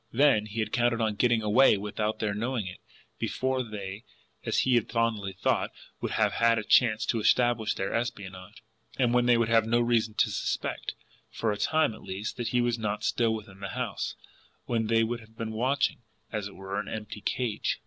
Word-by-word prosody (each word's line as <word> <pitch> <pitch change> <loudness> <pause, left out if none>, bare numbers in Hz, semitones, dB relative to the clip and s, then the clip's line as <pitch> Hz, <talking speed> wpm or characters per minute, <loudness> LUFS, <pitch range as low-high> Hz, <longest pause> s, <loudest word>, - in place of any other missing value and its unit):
Then, 125 -5 +4
he 110 +2 -3
had 110 0 -3
counted 120 -1 +2
on 110 -2 +1
GETTING 120 0 +2
AWAY 105 +2 +5
without 105 +2 -2
their 105 -2 -1
knowing 115 +1 -2
it, 90 - -8 0.4
before 130 0 -1
they, 105 -2 -6 0.4
as - - +1
he 130 - +2
had 120 -3 +2
fondly 110 -4 0
thought, 95 - 0 0.3
would - - -3
have - - +2
had 115 0 +3
a 110 - -1
chance 110 0 +4
to 115 - 0
establish 115 0 +2
their 95 - -2
espionage, 95 -6 -5 0.3
and 125 -2 +2
when 125 0 +3
they 120 -1 +6
would 115 -1 +2
have 115 -1 +4
had - - -5
no 120 +1 +4
reason 115 -2 +1
to - - +2
suspect, - - -3 0.3
for 110 - -1
a 105 - -2
time 155 +3 +2
at - - -12
least, 95 +3 -5
that 120 - -2
he 125 +2 +2
was 120 -1 0
not 105 -1 -2
still 115 -2 +2
within 100 -3 -10
the 100 0 -5
house, - - -3 0.5
when 115 -2 0
they 115 0 +3
would 120 +1 -2
have 110 0 -18
been 115 -2 -3
watching, 130 +5 +1 0.3
as 105 -3 -2
it 100 - -12
were, 95 +1 -4
an - - -5
empty 105 -1 -6
cage. 120 -5 -1
110 Hz, 210 wpm, -28 LUFS, 105-120 Hz, 0.5 s, they